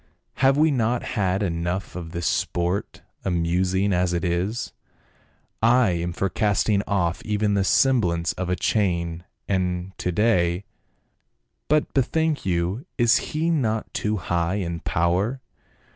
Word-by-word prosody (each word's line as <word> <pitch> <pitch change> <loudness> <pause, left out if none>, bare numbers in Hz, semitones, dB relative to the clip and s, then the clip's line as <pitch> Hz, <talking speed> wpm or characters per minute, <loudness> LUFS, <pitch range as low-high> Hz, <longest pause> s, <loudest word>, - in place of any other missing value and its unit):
" - - -49
Have 135 +1 +5
we 155 +1 +4
not 120 -2 0
had 95 -2 0
enough 85 +1 -2
of 85 -2 -6
this 85 -1 -4
sport, 90 +3 -1 0.2
amusing 90 +2 +1
as 90 0 +1
it 85 - -1
is? 90 +7 -2 0.9
I 120 -1 +4
am 85 0 -2
for 95 +3 -1
cast 105 0 +1
ing 100 -2 +3
off 90 -3 0
even 105 -1 0
the 100 -1 +2
semblance 95 -8 +2
of 90 -1 -4
a 90 - +1
chain 85 -5 0
— 105 - -52
and 90 -1 -1
to 90 - -1
day." 90 -2 +1 1.0
"But 150 0 +1
bethink 155 0 0
you, 90 - -1
is 120 -2 +5
he 160 +2 0
not 110 -9 -1
too 105 0 -1
high 85 0 -1
in 85 -4 -3
power? 90 +12 0
95 Hz, 145 wpm, -24 LUFS, 85-110 Hz, 1.0 s, Have